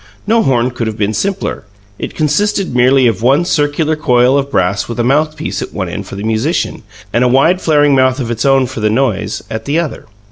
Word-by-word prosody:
No 225 +2 +3
horn 125 - +1
could 120 -2 -3
have 110 -1 -4
been 105 0 -1
simpler: 195 - -2 0.4
it - - -6
consisted 180 +4 0
merely 130 +1 +4
of 115 -2 +1
one 135 +8 +3
circular 150 0 0
coil 125 -3 +2
of 140 0 0
brass 100 -5 0
with 120 0 -6
a - - +2
mouthpiece 155 +4 -1
at - - -7
one - - -3
end - - -6
for - - -8
the 100 - -6
musician, 110 +9 -1 0.3
and 120 - +2
a - - +3
wide 150 +9 +3
flaring 145 -2 +3
mouth 130 0 +2
of 120 -3 -3
its 115 -1 -2
own, 135 -1 +3
for 125 -1 -7
the 110 0 +1
noise, 105 -4 -1
at 110 0 -5
the 145 +3 0
other. 170 -8 -3
130 Hz, 220 wpm, -14 LUFS, 115-150 Hz, 0.4 s, merely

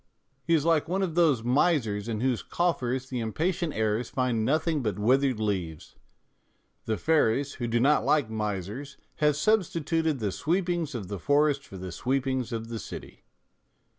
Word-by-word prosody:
He 165 - +3
is 155 -1 +1
like 165 -2 +3
one 190 +2 0
of 175 -4 -2
those 155 -9 +3
misers 120 - +1
in 110 -2 -2
whose 125 -2 +1
coffers 130 -7 -1
the 125 - -3
impatient 160 - -1
heirs 110 +2 0
find 125 -4 0
nothing 155 +4 +1
but 105 -5 -2
withered 130 +3 +2
leaves, 90 -7 -3 0.9
the 110 -1 -1
fairies, 145 -2 +2
who 120 - 0
do 120 +1 +1
not 145 +5 +4
like 150 -6 +2
misers, 110 +5 -4 0.2
having 150 -2 +3
substituted 165 -4 +1
the 105 -5 -2
sweepings 170 - -1
of 105 -6 -5
the 100 0 -5
forest 145 - +2
for 95 - -11
the 95 0 -6
sweepings 130 +3 -1
of 115 0 -4
the 115 -1 -4
city. - - -9
130 Hz, 165 wpm, -27 LUFS, 110-155 Hz, 0.9 s, not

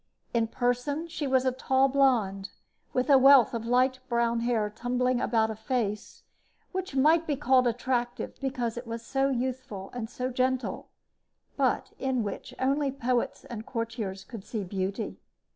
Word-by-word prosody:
In 230 -1 +2
person 245 +7 -1
she 300 -3 -3
was 260 -1 +2
a 260 - +3
tall 265 +1 +2
blonde, 235 -8 +2 0.4
with 255 0 0
a 275 -3 +7
wealth 270 -3 +7
of 230 -1 -3
light 255 +2 +3
brown 235 -1 +1
hair 230 -3 +1
tumbling 245 +3 0
about 220 -1 +2
a - - -5
face 220 -3 -3 0.5
which 375 -6 -4
might 315 +5 +4
be 295 - +1
called 260 -3 +3
attractive 240 0 -2
because 245 -4 -2
it 240 0 -6
was 230 0 -5
so 270 0 +1
youthful 255 -6 -3
and 230 -3 -4
so 250 +1 -3
gentle, 255 +1 -1 0.7
but - - 0
in 260 -3 0
which 205 - -5
only 275 +2 +1
poets 250 -2 -1
and 225 -2 -7
courtiers 225 -5 -4
could 220 -1 -9
see 215 -1 -4
beauty. 195 +3 -3
245 Hz, 160 wpm, -28 LUFS, 230-265 Hz, 0.7 s, a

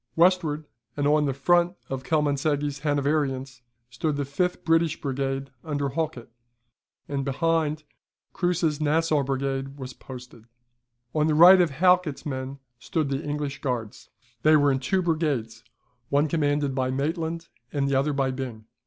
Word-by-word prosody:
Westward, 165 -3 +3 0.3
and 145 - 0
on 150 +1 +3
the 135 -1 -2
right 175 0 +4
of 135 -1 -4
Kielmansegge's 145 0 0
Hanoverians, 140 -3 -1 0.3
stood 145 +5 -1
the 145 0 -2
fifth 180 +6 -2
British 165 -1 +2
brigade 135 0 -3
under 145 -3 -2
Halkett; 150 -6 -3 0.8
and 140 -1 -2
behind, 155 +2 0 0.5
Kruse's 170 -4 0
Nassau 155 0 +2
brigade 135 0 -2
was 130 -2 -7
posted. 125 -4 -11 0.7
On 155 0 +2
the 155 - +2
right 180 +4 +9
of 175 - +3
Halkett's 180 0 +2
men 135 -1 -4 0.2
stood 155 -2 -1
the 135 +2 -2
English 145 -1 -3
Guards. 120 -6 -4 0.3
They 155 +3 +6
were 145 -1 +4
in 135 - 0
two 185 +8 0
brigades, 140 -9 -1 0.5
one 145 +2 +3
commanded 145 -3 0
By 130 -1 0
Maitland, 160 +5 -2 0.2
and 140 -2 0
the 140 - 0
other 135 +3 +2
by 135 -2 0
Byng. 125 -4 -6
145 Hz, 145 wpm, -26 LUFS, 135-160 Hz, 0.8 s, right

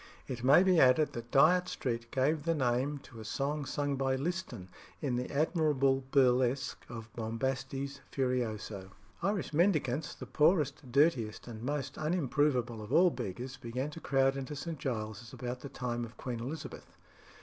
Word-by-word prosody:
It 125 -2 -5
may 140 +8 +7
be 185 -3 +4
added 135 +3 +5
that 120 0 -6
Dyot 175 +8 +5
Street 115 -2 -3
gave 145 +5 +1
the 165 0 +1
name 130 +1 +1
to 115 -4 -12
a - - -7
song 140 +6 -2
sung 145 0 -1
by 135 0 +1
Liston 135 - -3 0.3
in 135 -5 -1
the 125 +1 -2
admirable 140 -3 +2
burlesque 130 -1 +2
of 115 -2 -8
"Bombastes 135 +4 -3
Furioso." 110 -7 -2 0.3
Irish 195 -2 -1
mendicants 155 -5 +1
the - - -8
poorest, 150 -4 +2
dirtiest, 130 -7 +2
and 110 -2 -7
most 140 +1 -3
unimprovable 145 -7 +1
of 105 +2 -8
all 175 +4 +6
beggars 125 +6 -5
began 130 +4 -4
to 165 - -8
crowd 135 -2 +2
into 135 +1 -5
St. 160 +1 -5
Giles's 110 -3 -4
about 125 0 -5
the 140 - -8
time 120 -2 -3
of 115 0 -9
Queen 120 -3 -4
Elizabeth. 135 +7 -7
135 Hz, 160 wpm, -32 LUFS, 120-150 Hz, 0.3 s, may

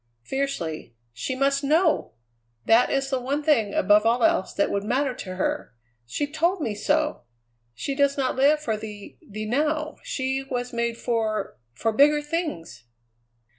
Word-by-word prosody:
fiercely; 170 - -3 0.2
"she 125 - -3
must 275 +1 +1
know! 315 +3 +2 0.5
That 225 +2 +5
is 275 0 -1
the 265 - +1
one 280 +4 -2
thing 230 -10 +2
above 210 +2 +5
all 230 +1 +2
else 190 - +2
that 200 - 0
would 200 0 -1
matter 260 +5 0
to 185 -6 -7
her; 185 -10 -2 0.3
she 290 - -1
told 335 +6 0
me 230 -9 -2
so! 300 +9 0 0.5
She 275 - -3
does 280 0 +2
not 260 -2 0
live 285 +3 +4
for 230 -8 -1
the 210 -1 -9
the 215 +1 -7
now; 300 +6 -1
she 270 - -2
was 250 -2 -4
made 235 0 -1
for 220 -4 -2 0.2
for 225 - 0
bigger 295 +5 +4
things!" 295 - -4
260 Hz, 160 wpm, -25 LUFS, 215-290 Hz, 0.5 s, That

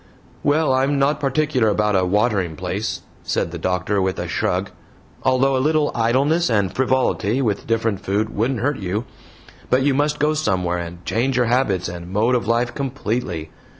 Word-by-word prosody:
"Well, 145 -1 +2
I'm 135 +2 +2
not 140 +2 +2
particular 140 -3 +1
about 105 0 +2
a 95 - +3
'watering 100 -4 +1
place,'" - - -3 0.2
said 80 - -1
the 85 - -6
doctor, 90 +3 0
with 95 -1 -1
a - - -3
shrug, - - -1 0.5
"although 130 +1 +2
a 130 - +1
little 150 +1 +2
idleness 135 +9 +2
and 100 -5 +1
frivolity 130 -3 +1
with 110 -7 -1
different 115 -3 0
food 105 +3 -1
wouldn't 115 +2 0
hurt 145 +2 0
you 100 +4 -2 0.6
but 130 +1 +3
you 140 0 +3
must 145 +2 +1
go 150 +1 +2
somewhere 90 - 0
and 85 0 -8
change 125 +3 0
your 125 - +3
habits 115 -7 +1
and 85 0 -7
mode 110 +5 +2
of 120 -4 0
life 120 +1 +1
COMPLETELY. 115 - -3
115 Hz, 175 wpm, -21 LUFS, 95-135 Hz, 0.6 s, a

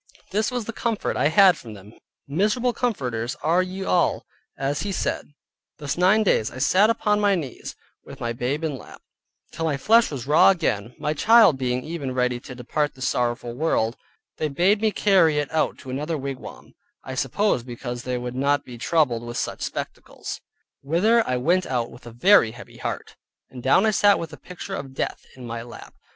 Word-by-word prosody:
This 210 +1 +1
was 245 -3 -3
the 230 - -5
comfort 230 -2 -2
I - - +2
had 185 +3 +6
from 110 -3 -10
them, 100 +2 -14 0.3
miserable 210 - +1
comforters 125 - -2
are 165 +4 +3
ye 185 +1 -5
all, 180 -2 +1 0.3
as 140 +1 -1
he 205 - -3
said. 180 - -3 0.5
Thus 145 -3 -3
nine 190 +5 +4
days 110 - +2
I - - -11
sat 185 +10 +4
upon 210 -2 +1
my 205 -1 +3
knees, 145 -8 -6 0.3
with - - -12
my 120 0 -2
babe 130 +6 -2
in 160 - 0
my 135 - -6
lap, - - -15 0.5
till 165 - -4
my 150 -3 0
flesh 225 +9 +4
was 135 -6 -6
raw 150 +6 +6
again; 125 - 0
my 150 - -1
child 210 - +5
being 125 -1 -1
even 145 -6 -5
ready 125 -1 0
to 125 - -10
depart 145 +4 -2
this 130 0 -3
sorrowful 120 -1 -1
world, 120 -5 0 0.4
they 155 - -1
bade 180 +9 +2
me 220 - +3
carry 185 -7 +3
it 145 -1 -1
out 160 -1 0
to 130 - -9
another 150 +5 -2
wigwam 135 -1 -8 0.3
(I 130 - -7
suppose 135 - 0
because 120 0 -6
they 125 0 -3
would 125 0 -5
not 140 +2 +1
be 120 -2 -10
troubled 130 -5 +1
with 120 0 -6
such - - -3
spectacles) - - -6 0.4
whither 205 +11 +3
I 125 - 0
went 175 +8 +1 0.2
with 120 0 -14
a - - -8
very 120 - +5
heavy 120 0 -13
heart, - - -5 0.3
and 125 - -9
down 135 - +4
I 220 - +3
sat 205 -1 +4
with 165 -1 -6
the 150 - -10
picture 180 +2 -9
of 135 -8 -6
death - - -4
in 130 -2 -10
my 115 0 -5
lap. 120 +1 -11
145 Hz, 195 wpm, -24 LUFS, 125-190 Hz, 0.5 s, had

